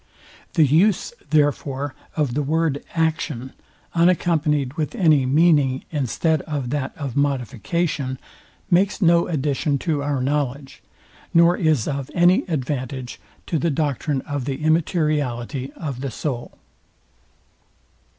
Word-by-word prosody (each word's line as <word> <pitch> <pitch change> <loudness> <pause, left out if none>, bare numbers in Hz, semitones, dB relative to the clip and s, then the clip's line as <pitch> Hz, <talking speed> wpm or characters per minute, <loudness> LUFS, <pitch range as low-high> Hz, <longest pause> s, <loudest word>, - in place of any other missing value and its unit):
The 160 -3 +5
use, 180 - +2 0.2
therefore, 145 -2 +1 0.2
of 145 -6 +1
the 150 - 0
word, 150 0 0
action, 155 -6 -1 0.4
unaccompanyed 160 -5 +2
with 155 +7 -3
any 155 - +4
meaning, 145 -3 +3
instead 155 +2 0
of 140 -5 -3
that 145 -3 -3
of 140 -5 -5
modification, 140 +1 -1 0.5
makes 190 +3 +3
no 170 -3 +4
addition 145 -2 0
to 150 -1 -1
our 140 -1 -1
knowledge, 140 0 -2 0.5
nor 170 +1 +6
is 155 -10 +1
of 140 -2 -3
any 175 +2 +4
advantage 130 -4 -3 0.3
to 165 - -1
the 170 - +1
doctrine 145 -1 -1
of 145 -3 -4
the 140 +2 -4
immateriality 150 -5 0
of 140 -6 -5
the 135 - -2
soul. 120 0 -5
145 Hz, 120 wpm, -22 LUFS, 135-160 Hz, 0.5 s, nor